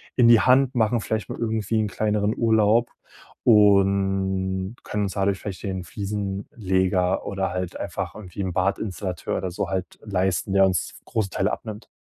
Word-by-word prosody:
in 120 -2 +5
die 120 -1 +8
Hand, 130 +2 +4
machen 115 0 +2
vielleicht 110 0 -3
mal - - -5
irgendwie 110 -1 -1
'n 110 - +1
kleineren 105 0 0
Urlaub 110 0 +3 0.5
und 95 -2 +3
können 105 0 -2
uns 100 - -2
dadurch 100 0 +1
vielleicht 100 -3 -6
den 95 -3 -3
Fliesenleger 95 -1 -1
oder 95 -1 -2
halt 90 -1 -4
einfach 90 -4 -4
irgendwie 100 -2 -7
'n 95 -1 -2
Badinstallateur 95 -1 -2
oder 95 0 -3
so 85 - -3
halt 95 -1 -4
leisten, 95 -1 -1
der 95 0 +6
uns 90 -4 -1
f - - -22
großen 110 -3 -1
Teil 95 - 0
abnimmt.“ 110 -1 -6
100 Hz, 165 wpm, -24 LUFS, 95-110 Hz, 0.5 s, die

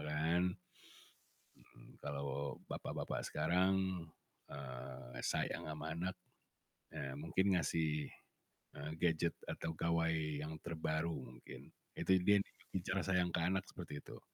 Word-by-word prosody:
kan. 80 +4 +3 1.2
Mhm, - - -17
kalau 70 -1 -2
bapak-bapak - - -2
sekarang, 95 -1 +3 0.4
eee, 65 -2 -6
sayang - - 0
sama 75 +1 -3
anak, 90 +3 -1 0.8
eee, 70 -1 -3
mungkin 95 +5 +3
ngasih, 75 -2 +2 0.7
eee, 75 +2 -4
gadget 85 -1 +3 0.2
atau 80 - -2
gawai 85 0 +3 0.3
yang 80 +1 -3
terbaru 80 0 0
mungkin, 60 -3 -8 0.3
itu - - +3
dia 100 +2 +7
juga - - -23
bicara 95 +1 +1
sayang 90 -2 +3
ke - - +3
anak 95 +2 +2
seperti 75 - -6
itu. - - -9
80 Hz, 115 wpm, -39 LUFS, 70-90 Hz, 1.2 s, dia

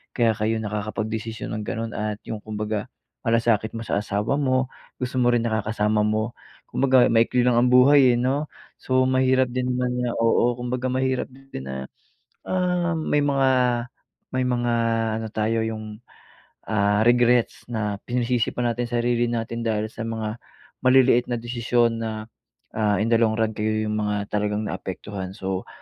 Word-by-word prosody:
kaya 115 -3 +3
kayo 110 +1 0
nakakapagdesisyon 110 +2 -4
ng 110 - -4
ganun 115 +1 -4
at 105 0 -3
yung 110 -2 -5
kumbaga 105 -1 -4 0.3
malasakit 115 -2 +2
mo - - -5
sa - - -1
asawa 105 +5 -1
mo. 130 -2 +1 0.3
Gusto 125 0 -4
mo 120 0 +4
rin 120 - +3
nakakasama 110 -1 0
mo, 110 +2 0 0.3
kumbaga 130 -2 +4
maikli 115 +2 +3
lang 125 - +4
ang 125 +1 +3
buhay, 130 0 +6
eh, - - 0
'no. 140 +4 -1 0.3
So, 130 0 +2
mahirap 130 0 +3
din 125 0 -1
naman 125 0 -1
na 120 - 0
oo 115 +1 +3
kumbaga 125 +1 -2
mahirap 130 0 0
din 135 - -10
na, 65 0 -6 0.6
ah, 180 -2 0
may 155 -2 +1
mga 135 -2 +2 0.8
may 130 0 +1
mga 120 -1 0 0.5
ano 110 - -4
tayo 110 +1 +1
yung, 110 -1 -6 0.7
ah, 105 0 +2
regrets 120 0 +3
na 105 -3 -2
pinasisi 120 -1 0
pa 125 - -1
natin 120 +1 -1
sarili 120 0 +1
natin 115 0 -3
dahil 110 -1 0
sa - - -7
mga 110 +1 -4 0.4
maliliit 130 -1 +4
na 120 - 0
desisyon 120 0 0
na, 110 -1 -4 0.5
ah, 105 -2 +1
in 115 +2 0
the 115 - +5
long 110 -1 +3
run 110 -1 0
kayo 110 +1 -1
yung 105 - -1
mga 105 -1 -2
talagang 105 0 0
naapektuhan. 95 0 -6
So, 95 0 -3
115 Hz, 160 wpm, -24 LUFS, 110-125 Hz, 0.8 s, buhay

